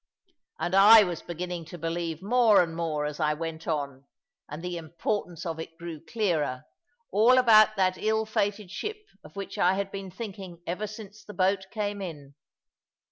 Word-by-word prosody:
And 175 - -3
I 210 +3 +9
was 175 -4 -4
beginning 175 0 -5
to 170 +2 -9
believe 165 0 -3
more 225 -2 +5
and 165 -1 -6
more 160 -3 -2
as 150 +1 -5
I 150 -1 +1
went 165 0 -6
on, 140 -4 -3 0.4
and 150 +3 -7
the 180 0 -3
importance 170 +1 -4
of 165 -1 -4
it 165 0 -8
grew 165 -2 -8
clearer, 165 - -1 0.5
all 235 +5 +5
about 215 -3 +6
that 185 -2 +1
ill 220 0 +1
fated 205 -2 -2
ship 425 - -4 0.3
of 150 - -15
which 200 -1 -6
I 180 +2 +4
had 195 0 -3
been 195 -1 -6
thinking 190 -4 -8
ever 190 +5 -3
since 210 0 -11
the 210 - -11
boat 190 +1 +1
came 205 -2 -3
in. 145 -7 -8
180 Hz, 175 wpm, -27 LUFS, 165-205 Hz, 0.5 s, I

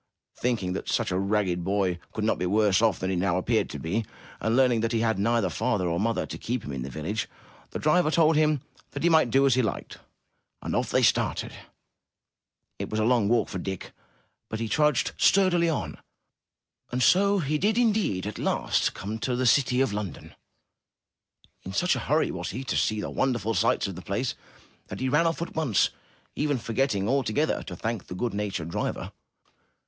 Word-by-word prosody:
Thinking 110 -7 -1
that 95 - -5
such - - 0
a 90 - 0
ragged 100 -3 0
boy 95 -2 0
could 110 - -4
not 110 - +1
be 90 - 0
worse 105 +1 +3
off 110 -6 +3
than 95 +1 -2
he - - 0
now 90 0 +1
appeared 110 +4 +1
to - - -6
be, 85 +11 -2 0.4
and 110 +1 0
learning 125 -3 +4
that 115 +1 -1
he 115 - +1
had 110 -3 +1
neither 115 -3 +1
father 110 -2 0
nor 85 0 0
mother 115 +2 0
to - - -8
keep 125 +1 -3
him - - -6
in 65 -2 -4
the 65 - -5
village, 85 - -3 0.4
the - - -5
driver 155 +1 +3
told 160 0 +4
him 150 -2 +2 0.3
that - - -4
he 170 - +4
might 160 -6 +4
do 135 +4 +4
as 135 - +4
he 130 - +3
liked. 110 -5 -4 0.6
And - - -2
off - - 0
they - - +2
started. - - +1 1.3
It - - -4
was 110 - -2
a - - +2
long 115 -4 +3
walk 115 -1 +2
for 95 - -5
Dick, 95 +1 -5 0.6
but 110 - -4
he 115 - -2
trudged 150 +2 +2
sturdily 180 -3 +4
on, 95 - -3 0.9
and 125 +1 0
so 200 +2 +4
he 150 -3 0
did 210 +5 +1
indeed 215 - +1
come 105 - -2
at - - -11
last - - 0 0.3
to 125 - 0
the 130 +1 0
city 125 0 +3
of 135 -6 +1
London. 100 -6 -6 1.3
In 95 - -8
such 175 - +2
a - - -2
hurry 155 +2 +2
was - - -4
he 130 - -5
to 135 - -3
see 110 -1 +1
the - - -5
won 130 -1 +1
derful 115 -1 -2
sights - - +2
of 95 - -4
the 90 - -8
place, 115 +7 -2 0.5
that 95 - -7
he 130 - 0
ran 150 +5 +3
off 165 0 -1
at - - -8
once 150 -10 +2 0.4
even 145 -2 0
forgetting 115 -4 -1
altogether 135 +3 +1
to 90 - -7
thank 110 +2 -4
the 90 - -7
good 115 +4 -2
natured 100 -5 -3
driver. - - -3
115 Hz, 205 wpm, -26 LUFS, 100-140 Hz, 1.3 s, learning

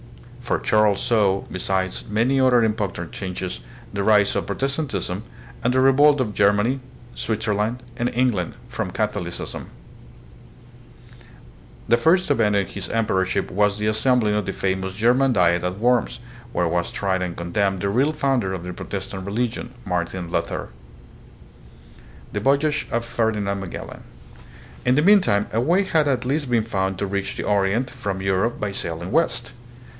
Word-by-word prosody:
For 125 - -1
Charles 105 -2 +3
saw, 105 -6 +2
besides 95 0 -1
many 115 +6 +2
other 125 -3 +5
important 105 -6 -2
changes, 95 -1 -5 0.3
the 100 0 -1
rise 105 -1 +4
of - - -1
Protestantism, 135 - -2 0.4
and 125 - +2
the 130 - +3
revolt 140 +2 +5
of 110 -5 -1
Germany, 105 +7 +2 0.3
Switzerland, 110 +2 -1
and 120 0 0
England 120 -8 0
from - - -3
Catholicism. - - -3 2.2
The 115 - +5
first 165 +8 +3
event 110 -6 +3
in 100 -1 +2
his 100 - -7
emperorship 100 -3 0
was 105 +1 +2
the 105 - -2
assembling 110 0 +2
of 105 -2 0
the 95 - -2
famous 95 0 -2
German 125 +5 +3
Diet 90 -4 +3
at 90 +1 -2
Worms, 120 +1 +1 0.3
where 90 -5 +1
was 85 +1 -1
tried 95 -2 -1
and 90 -2 -3
condemned 95 +3 0
the 100 - 0
real 130 +9 +2
founder 135 -9 0
of 95 -2 -4
the 90 0 -5
Protestant 95 0 -6
religion, 120 +3 -2
Martin 90 -1 -2
Luther. - - -2 1.6
The 105 - -1
Voyage 140 +6 +1
of 115 0 -1
Ferdinand 110 -4 -1
Magellan. 95 -2 -7 0.8
In 125 +1 +3
the 150 - +3
mean 205 +2 +7
time 100 - +1
a 115 - +2
way 175 +9 +3
had 160 -5 +2
at 130 -3 0
last 140 +1 -1
been 120 -2 +2
found 95 -4 -1
to 100 - -1
reach 100 0 -3
the - - -3
Orient 105 +5 +1
from 100 -6 -4
Europe 95 +5 0
by 105 -1 -2
sailing 85 -1 -5
west. 125 -7 0
105 Hz, 155 wpm, -23 LUFS, 95-125 Hz, 2.2 s, mean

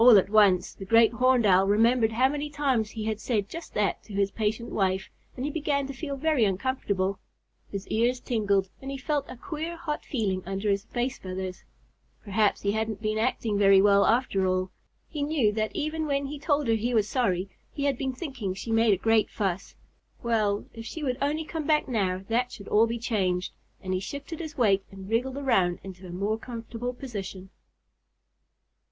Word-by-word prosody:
All 240 -3 +9
at 195 +1 +2
once 200 -4 +4
the - - -9
Great 230 +3 +5
Horned 250 0 +3
Owl 190 -1 +5
remembered 225 +2 +3
how 255 +4 +4
many 295 +2 -3
times 265 -7 0
he 215 -1 -5
had 220 -1 -2
said 215 -4 -1
just 335 +8 -9
that 205 -1 +1
to 210 - -11
his 200 0 +1
patient 220 +2 -2
wife, 190 -1 0 0.2
and 255 - -3
he 295 - -1
began 285 -2 0
to 275 - -6
feel 280 +1 -4
very 305 -3 +2
uncomfortable. 200 -2 0 0.5
His 200 -1 -5
ears 240 +3 +2
tingled 205 -6 +1
and 270 - -6
he 275 - -4
felt 285 +1 -2
a - - -7
queer 330 +3 -5
hot 310 -3 -4
feeling 200 -8 -1
under 195 +2 -1
his 200 +1 -1
face 245 +3 -2
feathers. 185 0 -5 0.6
Perhaps 210 0 +1
he 200 - +2
hadn't 220 0 -2
been 215 0 -1
acting 220 -3 0
very 195 -1 +7
well 200 0 +5
after 220 -5 +2
all! 185 0 0 0.4
He 300 - -5
knew 285 -7 +2
that 215 0 -2
even 310 +1 -2
when 280 -1 0
he 290 +1 -6
told 290 -2 +1
her 225 - +3
he 235 +2 0
was 210 -2 +3
sorry, 195 -7 0 0.2
he 285 - -4
had 280 -1 +2
been 265 -1 -1
thinking 250 - -4
she 225 +4 -5
made 225 -2 +4
a - - -7
great 225 +2 +3
fuss. 195 -2 -3 0.5
Well, 215 -3 +1
if 225 - -8
she 305 +7 -6
would 255 -2 -1
only 305 +3 0
come 315 -2 -4
back 305 -1 +3
now, 190 -6 0
that 245 +2 0
should 215 -6 -10
all 220 +2 +5
be 230 +1 -2
changed, 190 -6 -1 0.3
and 185 0 -2
he 185 - +1
shifted 285 - -6
his 315 -3 -6
weight 200 -5 +3
and 195 -1 -10
wriggled 250 +5 0
around 190 -11 +2
into 185 -1 -9
a - - -8
more 200 +5 -1
comfortable 235 +1 -5
position. 195 -7 -7
225 Hz, 200 wpm, -27 LUFS, 195-265 Hz, 0.6 s, All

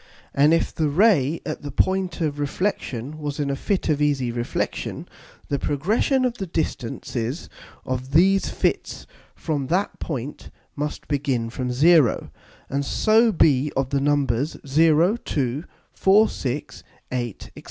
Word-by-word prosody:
And 145 +3 +4
if 165 - +1
the 155 -2 0
Ray 165 - +3
at 155 - -4
the 145 - -6
point 185 +2 0
of 150 -2 -1
Reflexion 145 - -3
was 145 -1 -4
in 140 -1 0
a - - -1
Fit 195 +7 -1
of 150 -2 +1
easy 135 -5 +1
Reflexion, 120 0 -3 0.4
the 140 - -1
progression 215 - +1
of 245 -1 -2
the 195 - -3
distances 125 -3 -3 0.4
of 130 +1 -4
these 190 +5 +4
Fits - - -2 0.3
from 145 -5 -2
that 185 +7 -1
point 140 -2 -5 0.3
must 150 +1 -4
begin 135 -5 -1
from 125 +1 -3
0, 150 -1 +4 0.4
and 140 +1 -1
so 220 - +3
be 150 -6 +3
of 135 -1 -1
the 140 -1 +1
Numbers 145 -1 +1
0, 160 - +4
2, 140 - -2 0.3
4, 205 +3 +5
6, 135 +2 -5 0.3
8, 120 -4 -3
&c. - - -13
145 Hz, 145 wpm, -23 LUFS, 135-170 Hz, 0.4 s, 4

